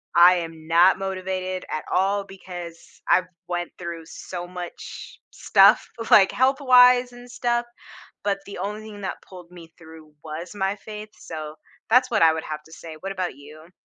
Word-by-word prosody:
I 175 +1 +8
am 165 -2 -6
not 170 +3 +5
motivated 185 -1 -3
at 155 - -4
all, 200 +2 +1
because 175 -3 -10
I've 180 +1 +3 0.2
went 175 -1 -3
through 170 -2 -7
so 175 +1 -7
much 180 -1 -9
stuff, - - +5 0.2
like, 195 -2 +7
health-wise 250 -2 +5
and 245 0 -13
stuff, 240 0 0 0.6
but 200 -1 0
the 200 - -8
only 205 +3 -4
thing 215 -2 -10
that 190 - -5
pulled 180 -2 -13
me 165 -2 -14
through 160 -2 -15
was 160 +3 -7
my 195 0 -1
faith, 210 +1 -9
so, 155 -2 -8 0.3
that's 250 +2 +4
what 220 - +2
I 160 -1 +6
would 160 - -4
have 155 -1 -6
to 160 - -19
say. 160 0 -10
What 195 +5 -6
about 180 -6 -3
you? 155 +3 -14
180 Hz, 170 wpm, -24 LUFS, 165-205 Hz, 0.6 s, I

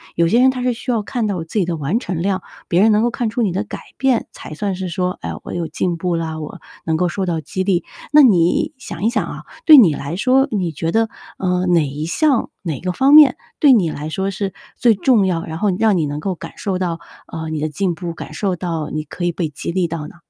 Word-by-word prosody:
有 170 0 +2
些 235 - +4
人 260 +1 +6
他 255 -1 -3
是 250 - +2
需 245 +2 -4
要 230 -3 +1
看 230 0 -2
到 185 -5 -2
自 165 +6 -3
己 185 - +2
的 170 0 -2
完 155 +8 -1
成 180 -9 -4
量， 190 0 0 0.3
别 175 - +3
人 215 +1 +5
能 210 +1 +3
够 240 - +2
看 235 -1 -2
出 240 - -2
你 210 -5 +1
的 195 +4 -2
改 - - -7 0.2
变， 265 -4 +1
才 - - -10
算 195 +4 -2
是 185 0 -4
说， 180 +1 -2
哎， - - -4
我 - - -8
有 170 -2 -2
进 175 0 -2
步 175 0 -1
啦， 160 -1 -3
我 150 - -8 0.2
能 160 - +1
够 180 +2 +1
受 190 +2 -2
到 165 -3 -1
激 185 +5 -3
励。 185 -3 +1 0.3
那 300 - +10
你 250 - +3
想 200 -8 -7
一 - - +4
想 240 - -1
啊， - - -8 0.2
对 310 - +10
你 195 - +7
来 140 +4 -5
说， 260 +7 +3
你 185 -5 -1
觉 165 +2 -3
得， 225 +2 +2 0.3
嗯， 180 -1 +1
哪 165 -2 +4
一 145 +3 -5
项、 270 - +1
哪 160 -7 -4
个 180 - -2
方 265 +9 +2
面 295 -4 +8 0.2
对 285 -3 +6
你 190 -9 +3
来 150 0 -5
说 190 +5 -2
是 195 -1 -3 0.2
最 235 -2 +4
重 220 0 +3
要， 170 -3 -1
然 160 - -6
后 200 +3 +1
你 180 - -2
让 215 -3 +3
你 160 - +1
能 145 0 -4
够 185 +4 -3
感 - - -9
受 190 -2 -2
到， 175 -3 -2 0.3
呃， 160 -1 -6
你 155 -1 -3
的 155 +1 -1
进 180 +2 -1
步， 170 +1 -5
感 - - -9
受 195 -3 -1
到 165 -3 -4
你 155 0 -3
可 175 +4 -5
以 175 - +1
被 170 -2 -3
激 150 - -5
励 180 0 0
到 165 -1 -5
呢？ - - -14
180 Hz, 285 characters per minute, -19 LUFS, 165-220 Hz, 0.3 s, 那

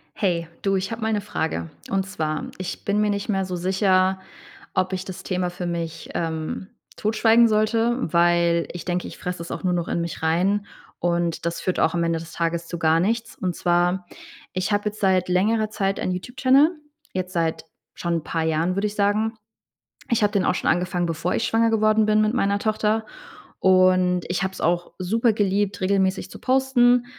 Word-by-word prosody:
Hey, 175 -5 0
du, 195 -1 +1
ich 190 +2 -2
habe 225 0 -5
mal 220 0 0
'ne 210 -1 0
Frage. 160 - -3 0.2
Und 195 -1 0
zwar, 155 -5 -3
ich 185 - -6
bin 205 +1 +1
mir 210 - +2
nicht 200 +1 -2
mehr 195 -2 +1
so 185 -1 -4
sicher, 190 +1 +2 0.6
ob 185 +1 +1
ich 185 0 -3
das 190 - -8
Thema 180 -1 -1
für 180 0 -6
mich, 170 -2 -4
ähm, 160 +2 -3 0.3
totschweigen 225 +2 +4
sollte, 225 +2 +2 0.2
weil 170 0 +3
ich 175 - -8
denke, 180 0 -2
ich - - -10
fresse 180 -1 -5
es 170 - -7
auch - - -5
nur 180 -1 +1
noch 175 -1 -1
in 170 - -1
mich 170 0 -5
rein. 185 +6 +1 0.3
Und 170 -1 -1
das 170 0 -3
führt 185 - -1
auch 160 - +2
am 170 - +1
Ende 165 -1 0
des 160 0 -10
Tages 170 0 -2
zu 170 - -5
gar 160 0 +3
nichts. 225 +5 -1
Und 180 -2 -3
zwar: 175 +1 +1 0.5
Ich 185 +3 -1
habe 205 +1 +1
jetzt 210 - -13
seit 185 -2 +2
längerer 215 +4 +2
Zeit 195 -2 -1
ein - - -1
YouTube-Channel. 260 - +3 0.4
Jetzt 185 0 -3
seit 165 -3 -1 0.3
schon 170 -1 -2
'n 160 - -5
paar 165 0 -2
Jahren, 160 +3 0
würde 200 +2 +1
ich 205 - -7
sagen. 210 +2 +1 0.8
Ich 235 -2 +2
habe 210 0 +3
den 200 -3 +1
auch - - +2
schon - - 0
angefangen, 175 0 0
bevor 165 +1 -2
ich - - 0
schwanger 225 0 +2
geworden 215 -1 +3
bin 215 0 +3
mit 215 0 +2
meiner 200 -5 +1
Tochter. 215 0 0 0.6
Und 185 -1 +4
ich 180 - -1
habe 190 0 -1
es - - -9
auch 175 +1 0
super 225 +5 +1
geliebt, 200 -1 0
regelmäßig 190 0 +1
zu - - -10
posten. 250 -2 +3
185 Hz, 200 wpm, -23 LUFS, 175-210 Hz, 0.8 s, totschweigen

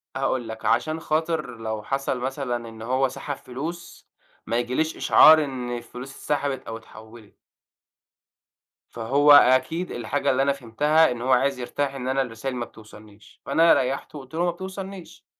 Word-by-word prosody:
هاقول 120 -3 -1
لك، 110 0 -8
عشان 155 +1 +1
خاطر 160 -4 -2
لو 110 -1 -4
حصل 135 0 -2
مثلًا 125 -3 -3
إن 110 -1 -12
هو 130 +3 +1
سحب 140 +2 -6
فلوس 155 +8 -8 0.4
ما 115 - 0
ييجيليش 130 +7 -1
إشعار 155 0 +7
إن 125 -3 -4
الفلوس 125 +2 -9
اتسحبت 140 -1 -2
أو 115 - -5
اتحوّلت. 110 -1 -15 1.5
فهو 140 +6 +2
أكيد 145 +6 +5
الحاجة 135 +5 -2
اللي 130 - +1
أنا 140 0 +2
فهمتها، 145 +5 +2
إن 120 -1 -5
هو 130 +2 0
عايز 135 +1 +2
يرتاح 140 +2 -3
إن 130 -1 -5
أنا 135 +1 +1
الرسايل 125 +1 -4
ما 120 -1 -3
بتوصلنيش، 105 -1 -17
فأنا 165 +1 +5
ريّحته 135 +3 -2
وقُلت 130 +1 -14
له: 170 - 0
"ما 175 - +1
بتوصلنيش." 190 0 -9
130 Hz, 155 wpm, -24 LUFS, 120-150 Hz, 1.5 s, إشعار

